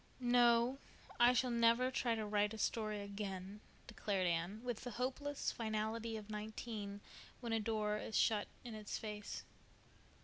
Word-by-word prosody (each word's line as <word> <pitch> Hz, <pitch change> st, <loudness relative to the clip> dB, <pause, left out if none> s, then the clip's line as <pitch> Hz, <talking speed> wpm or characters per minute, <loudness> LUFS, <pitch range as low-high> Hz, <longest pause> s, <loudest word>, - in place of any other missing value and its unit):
"No, 240 Hz, +1 st, +4 dB, 0.4 s
I 240 Hz, +1 st, +8 dB
shall 250 Hz, 0 st, +2 dB
never 235 Hz, +2 st, +4 dB
try 240 Hz, -3 st, +1 dB
to 220 Hz, -1 st, -2 dB
write 210 Hz, +1 st, +1 dB
a -, -, -7 dB
story 215 Hz, -1 st, 0 dB
again," 200 Hz, 0 st, -5 dB, 0.2 s
declared 200 Hz, -5 st, -1 dB
Anne, 175 Hz, +4 st, 0 dB
with 245 Hz, -3 st, -3 dB
the 250 Hz, -, -4 dB
hopeless 265 Hz, +4 st, -1 dB
finality 220 Hz, 0 st, -2 dB
of 210 Hz, -2 st, -8 dB
nineteen 210 Hz, -1 st, -5 dB, 0.4 s
when 235 Hz, -2 st, -2 dB
a 225 Hz, -, +3 dB
door 210 Hz, -1 st, 0 dB
is 220 Hz, -, -2 dB
shut 210 Hz, -2 st, +3 dB, 0.2 s
in 240 Hz, -2 st, -6 dB
its 215 Hz, -1 st, -4 dB
face. 210 Hz, -1 st, -5 dB
220 Hz, 150 wpm, -38 LUFS, 210-235 Hz, 0.4 s, I